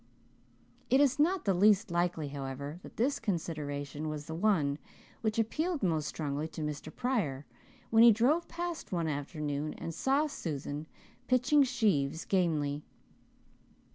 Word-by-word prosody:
It 265 - +5
is 285 0 +3
not 350 +3 +2
the 195 - +3
least 205 +2 +4
likely, 170 -3 0
however, 140 +3 -5
that - - -13
this 265 +5 +1
consideration 155 - -3
was 150 -1 -5
the 160 - -6
one 160 -6 +1 0.4
which 220 -1 -1
appealed 305 - 0
most 160 -5 +1
strongly 150 0 -3
to 160 0 -6
Mr. 150 -1 -4
Pryor 195 - -1 0.5
when 225 0 +6
he 235 0 +10
drove 260 +11 +2
past 345 -1 -5
one 170 -3 0
afternoon 150 0 -3
and 165 - -5
saw 275 - +2
Susan 155 - -4 0.4
pitching 255 +4 +4
sheaves 195 - +1
gamely. 150 -6 0
170 Hz, 140 wpm, -31 LUFS, 150-235 Hz, 0.5 s, he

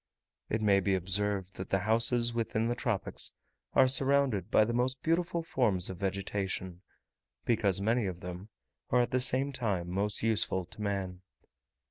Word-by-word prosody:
It 110 0 -1
may 100 -2 +4
be 95 0 +1
observed, 95 +1 -2
that 95 - -6
the 95 - +2
houses 115 +2 +3
within 115 0 -1
the - - +1
tropics 115 -5 -2 0.4
are 130 - +7
surrounded 135 -4 +2
by 110 - +4
the 120 - -2
most 125 +2 0
beautiful 170 +1 0
forms 105 - +1
of 95 - -8
vegetation, 95 -2 -3 0.6
because 100 -5 +1
many 110 +1 +1
of 90 -1 -6
them 90 +3 -8 0.4
are 125 - +3
at - - -4
the 130 - +2
same 130 +2 +4
time 100 -9 -2
most 100 +3 -2
useful 105 -4 +1
to 105 +5 -12
man. 95 -3 -3
105 Hz, 160 wpm, -30 LUFS, 95-120 Hz, 0.6 s, are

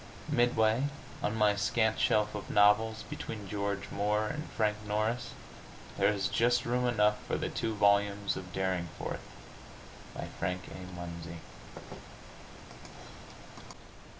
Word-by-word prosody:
Midway 120 +1 +3 0.4
on 105 - 0
my 105 -2 +4
scant 110 +2 +1
shelf 105 0 +2
of 105 - -6
novels, 105 +2 +4
between 105 -3 -6
George 100 0 -3
Moore 105 +1 +1
and 150 +2 -5
Frank 105 -1 0
Norris, 110 +4 -1 0.6
there - - +3
is 100 -2 0
just 120 +4 +2
room 125 +1 +1
enough 105 -3 +2
for - - 0
the - - -2
two 110 -1 -2
volumes 100 0 +3
of 90 -1 -7
"Derringforth," 95 -3 -3 0.9
by - - -4
Frank 90 +1 -1
A. 90 -1 -9
Munsey. 85 -1 -7
105 Hz, 120 wpm, -31 LUFS, 100-110 Hz, 0.9 s, my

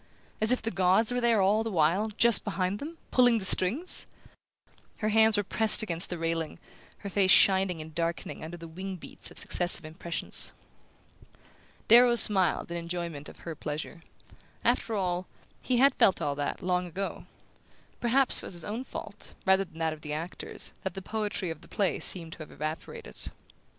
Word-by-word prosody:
_...As 220 +2 +3
if 255 - +1
the 225 - -2
gods 190 +5 +2
were 245 - -1
there 230 -4 +3
all 210 +3 +2
the 225 - -3
while, 180 +3 +2
just 235 -1 +4
behind 195 -1 -2
them, 325 +3 -8
pulling 245 -2 +4
the 200 - -2
strings?" 230 - +1 0.9
Her 215 - -1
hands 220 0 +4
were 205 - +1
pressed 220 +3 +4
against 170 -4 -4
the 175 - -4
railing, 165 -1 -3 0.4
her 200 - -6
face 190 -1 +2
shining 190 -3 +5
and 155 0 -10
darkening 170 0 -3
under 165 +2 -7
the 165 0 -10
wing 185 +4 -6
beats 175 - -7
of - - -14
successive 175 -2 +4
impressions. 170 +2 -1 1.3
Darrow 240 +1 +7
smiled 190 -7 +4
in 170 - -3
enjoyment 170 -3 -5
of - - -15
her 165 - -6
pleasure. 155 +3 -6 0.6
After 225 - 0
all, 180 -2 -2 0.3
he 250 - 0
had 275 +3 +5
felt 190 - +3
all 145 - -1
that, 145 +6 -4
long 180 0 0
ago; 190 +3 -5 0.7
perhaps 255 +3 +3
it - - -2
was - - -4
his 170 - -3
own 225 +5 -4
fault, - - -10
rather 190 +1 +3
than 160 - -18
that 160 -1 -1
of 155 - -12
the 150 0 -5
actors, 165 +4 -5
that 190 -2 -5
the 195 - -7
poetry 210 -4 -3
of 160 -1 -9
the - - -15
play 195 -3 -1
seemed 165 -3 -1
to - - -11
have 155 - -9
evaporated... 155 - -5
185 Hz, 180 wpm, -28 LUFS, 165-215 Hz, 1.3 s, Darrow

